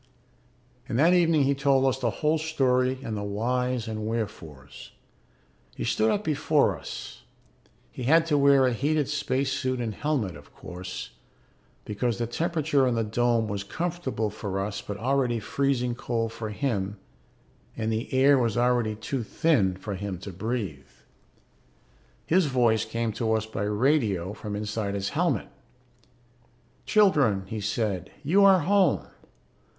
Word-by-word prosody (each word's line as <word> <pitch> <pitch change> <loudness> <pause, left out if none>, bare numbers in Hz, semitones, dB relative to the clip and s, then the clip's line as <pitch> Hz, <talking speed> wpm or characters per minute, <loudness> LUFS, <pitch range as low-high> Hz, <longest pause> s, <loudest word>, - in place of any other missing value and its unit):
And 115 - -1
that 165 +6 +5
evening 165 -4 +4
he 140 +1 +2
told 135 -1 +2
us 135 0 +1
the 120 -3 +1
whole 155 +7 0
story 130 -5 +1
and 110 - -4
the 105 - -3
whys 120 +4 -1
and 110 -1 -4
wherefores. 80 - -6 0.8
He - - -4
stood 110 +1 +1
up 210 - 0
before 150 -2 +2
us. - - -8 0.7
He 125 - -6
had 165 +5 +5
to 160 -3 +1
wear 140 -1 +5
a 125 - +2
heated 145 +3 0
space 140 -2 -1
suit 130 -1 -1
and 115 -3 -2
helmet, 115 - -1
of 75 0 -15
course, 90 0 -7 0.7
because 110 +3 -1
the 120 - -1
temperature 150 0 +1
in 125 - +1
the 115 - +1
dome 115 +1 +1
was 100 -1 -3
comfortable 165 - -3
for 95 -2 -4
us 100 0 -3
but 100 - -6
already 125 0 0
freezing 125 +1 0
cold 115 -1 -2
for 110 -1 -5
him 105 -4 -2 0.8
and 110 -1 -1
the 115 +5 -3
air 135 +1 +5
was 115 -2 0
already 120 -3 +2
too 120 +5 -3
thin 110 - +1
for 100 +2 -5
him 100 -1 -4
to 100 - -7
breathe. 95 - -4 1.4
His 180 -1 +3
voice 120 -5 +2
came 115 0 -2
to 110 +1 -1
us 110 -1 0
by 110 -2 -4
radio 105 - +1
from 105 -1 -6
inside 105 -1 -3
his 100 0 -2
helmet. - - 0 1.4
"Children," 145 - +3
he 110 +2 -5
said, 105 -3 -2
"you 185 +8 +4
are 190 -2 +6
home. 190 0 +2
120 Hz, 150 wpm, -26 LUFS, 105-140 Hz, 1.4 s, are